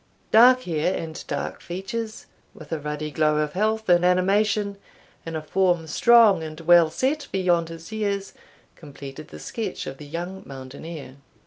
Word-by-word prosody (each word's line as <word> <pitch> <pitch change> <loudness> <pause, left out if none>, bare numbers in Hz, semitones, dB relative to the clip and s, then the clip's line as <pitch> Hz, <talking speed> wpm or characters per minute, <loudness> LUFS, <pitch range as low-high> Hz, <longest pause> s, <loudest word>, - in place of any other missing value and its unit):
Dark 250 +3 +7
hair, 165 +2 0
and 160 -1 -6
dark 140 - -4
features, 215 +5 -5 0.3
with 155 -2 -13
a 160 - -1
ruddy 150 +1 -4
glow 150 0 +2
of 150 -1 -1
health 220 +3 0
and 175 -1 +5
animation, 200 +3 +2 0.5
and 165 -1 -3
a 155 - -6
form 175 0 +1
strong 215 +3 +5
and 155 0 -7
well 170 -1 +6
set 280 - -1
beyond 175 -3 +1
his 165 +3 -10
years, 200 -2 -2 0.4
completed 145 -1 -10
the 75 - -11
sketch 195 - -5
of 135 - -7
the 150 - -10
young 175 +5 -5
mountaineer. 135 +1 -9
175 Hz, 155 wpm, -24 LUFS, 155-200 Hz, 0.5 s, Dark